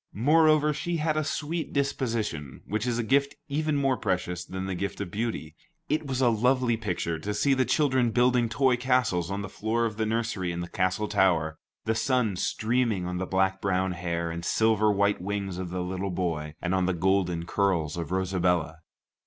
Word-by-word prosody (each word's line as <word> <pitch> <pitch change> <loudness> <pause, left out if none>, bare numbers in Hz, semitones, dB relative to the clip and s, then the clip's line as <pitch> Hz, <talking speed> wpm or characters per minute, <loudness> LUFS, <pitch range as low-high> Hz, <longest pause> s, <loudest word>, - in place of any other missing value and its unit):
Moreover, 150 +3 +4
she 165 +4 -2
had 155 0 0
a 155 - +1
sweet 155 +2 -3
disposition, 115 - -2
which 110 +3 -2
is 120 -1 0
a 120 - 0
gift 140 +4 +2
even 155 +1 0
more 135 -2 +2
precious 90 -4 -2
than 95 0 -5
the 95 - -2
gift 95 +2 -4
of 100 -4 -4
beauty. 105 -8 -3 0.3
It 155 0 0
was 130 -1 -1
a 125 - +5
lovely 125 +1 +2
picture 90 -6 -2
to 105 +6 -3
see 135 +7 +3
the 130 -1 +2
children 130 -5 +2
building 120 0 +3
toy 125 +2 +2
castles 125 -9 +1
on 100 +1 -3
the - - -4
floor 110 +4 -1
of 110 -2 -3
the 110 -1 0
nursery 110 -5 -1
in 85 - -4
the 85 - -4
castle 95 +4 0
tower, 80 -6 +2 0.3
the 110 - +2
sun 115 -2 +1
streaming 110 -1 0
on 90 0 -3
the 95 - -3
black 95 0 +1
brown 95 -1 +1
hair 85 -1 -2
and 85 +1 -5
silver 110 +2 +3
white 100 -1 +1
wings 100 -1 -3
of 90 -1 -4
the 90 +1 -3
little 95 +2 -3
boy, 80 -4 -2
and 90 +1 -1
on 95 -1 +2
the 95 - +1
golden 90 -1 +1
curls 85 -6 0
of 85 -1 -4
Rosabella. 90 -3 0
100 Hz, 195 wpm, -27 LUFS, 90-125 Hz, 0.3 s, a